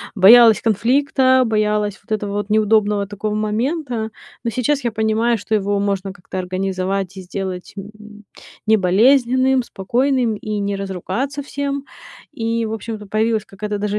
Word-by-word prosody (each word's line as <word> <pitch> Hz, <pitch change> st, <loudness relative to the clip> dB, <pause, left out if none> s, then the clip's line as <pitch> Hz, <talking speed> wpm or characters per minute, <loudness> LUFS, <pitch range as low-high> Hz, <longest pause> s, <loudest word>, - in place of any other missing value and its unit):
боялась 225 Hz, +3 st, +7 dB
конфликта, 260 Hz, +4 st, +3 dB
боялась 210 Hz, -2 st, 0 dB
вот 230 Hz, -, -20 dB
этого 205 Hz, -1 st, -5 dB
вот 205 Hz, 0 st, -3 dB
неудобного 210 Hz, -1 st, +2 dB
такого 210 Hz, +1 st, -4 dB
момента, 230 Hz, +2 st, -2 dB, 0.3 s
но 235 Hz, -, -1 dB
сейчас 255 Hz, +5 st, 0 dB
я 235 Hz, -, 0 dB
понимаю, 220 Hz, +2 st, +1 dB
что 220 Hz, -, -2 dB
его 205 Hz, 0 st, 0 dB
можно 200 Hz, -1 st, -2 dB
как-то 185 Hz, 0 st, -7 dB
организовать 185 Hz, +1 st, -2 dB
и 190 Hz, -, -6 dB
сделать, 185 Hz, 0 st, -6 dB
м, 210 Hz, +1 st, -11 dB, 0.4 s
не 220 Hz, 0 st, +4 dB
болезненным, 255 Hz, +7 st, +3 dB
спокойным 240 Hz, +3 st, 0 dB
и 210 Hz, 0 st, -4 dB
не 200 Hz, 0 st, -2 dB
разругаться 195 Hz, +9 st, -4 dB
всем. 280 Hz, 0 st, -4 dB, 0.5 s
И 230 Hz, 0 st, -2 dB
в 220 Hz, -, -4 dB
общем-то 220 Hz, -1 st, -6 dB
появилась 215 Hz, +1 st, 0 dB
какая-то 210 Hz, +1 st, -5 dB
даже 205 Hz, 0 st, -2 dB
215 Hz, 145 wpm, -19 LUFS, 200-235 Hz, 0.5 s, боялась